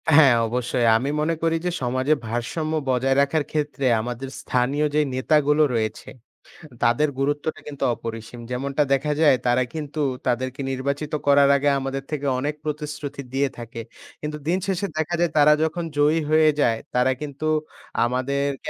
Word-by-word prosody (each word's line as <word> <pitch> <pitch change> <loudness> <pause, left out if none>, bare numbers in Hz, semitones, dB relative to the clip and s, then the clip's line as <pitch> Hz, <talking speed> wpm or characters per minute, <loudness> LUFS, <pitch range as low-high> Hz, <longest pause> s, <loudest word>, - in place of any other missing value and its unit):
হ্যাঁ, 140 -6 +7
অবশ্যই 120 0 0
আমি 135 +5 -2
মনে 160 +2 +1
করি 165 0 +2
যে, - - +2
সমাজে 130 +4 +1
ভারসাম্য 120 +8 -2 0.2
বজায় 130 +1 +2
রাখার 145 +2 +1
ক্ষেত্রে 145 -3 -2 0.2
আমাদের 125 +3 -5
স্থানীয় 135 +4 0
যে 150 - +4
নেতাগুলো 150 +3 +3
রয়েছে 110 -1 -2 0.7
তাদের 120 +6 +3
গুরুত্বটা 145 +3 -1
কিন্তু 140 -2 -4
অপরিসীম। 115 +1 -7
যেমনটা 135 +3 0
দেখা 140 +2 +1
যায় 145 -5 +6
তারা 120 +1 +3
কিন্তু 150 0 -4 0.3
তাদেরকে 130 +2 -1
নির্বাচিত 140 +3 -3
করার 140 0 +6
আগে 140 +1 +1
আমাদের 135 0 -3
থেকে 145 -2 -3
অনেক 145 +3 -2
প্রতিশ্রুতি 150 -2 -5
দিয়ে 135 +1 +1
থাকে 115 0 -7 0.4
কিন্তু 150 0 -4
দিন 180 - +2
শেষে 195 0 -1
দেখা 160 +2 -1
যায় 175 -1 +2
তারা 150 +1 +7
যখন 170 +2 -2
জয়ী 150 +3 +3
হয়ে 155 0 +5
যায় 115 -4 +2 0.2
তারা 125 +1 +3
কিন্তু 150 +1 -5 0.6
আমাদেরকে 135 +3 -1
140 Hz, 155 wpm, -23 LUFS, 125-150 Hz, 0.7 s, হ্যাঁ